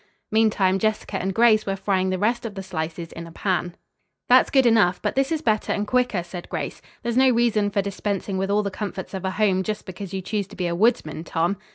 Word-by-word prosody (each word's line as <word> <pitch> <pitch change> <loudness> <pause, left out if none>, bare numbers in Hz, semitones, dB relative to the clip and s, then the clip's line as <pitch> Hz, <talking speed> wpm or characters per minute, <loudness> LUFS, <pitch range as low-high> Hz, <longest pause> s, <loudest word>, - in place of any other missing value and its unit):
Meantime, 210 -3 +3
Jessica 215 -1 -1
and 190 - -1
Grace 225 -2 +4
were 195 - 0
frying 190 -1 0
the 185 - 0
rest 235 +5 0
of 220 -3 -6
the 195 - -5
slices 165 -2 -5
in 170 0 -8
a - - -11
pan. 175 -1 -1 0.5
"That's - - +6
good 265 -2 +4
enough, 210 -6 +4
but - - -1
this 270 +2 +1
is 320 -1 -1
better 215 -4 +1
and 205 - -1
quicker," 245 -6 +1
said 175 0 -9
Grace. - - -4 0.2
"There's 235 0 -1
no 260 0 +6
reason 230 -4 +2
for 200 0 0
dispensing 200 -1 -3
with 195 +1 -1
all 210 +1 +2
the 200 - -3
comforts 195 -2 -5
of 190 -1 -4
a - - +1
home 190 -1 +2
just 210 +2 -4
because 190 0 -7
you 190 -1 -4
choose 200 0 -2
to - - -13
be 180 - -2
a 170 - 0
woodsman, 175 -5 +1
Tom." 170 +3 0
200 Hz, 235 wpm, -23 LUFS, 185-220 Hz, 0.5 s, That's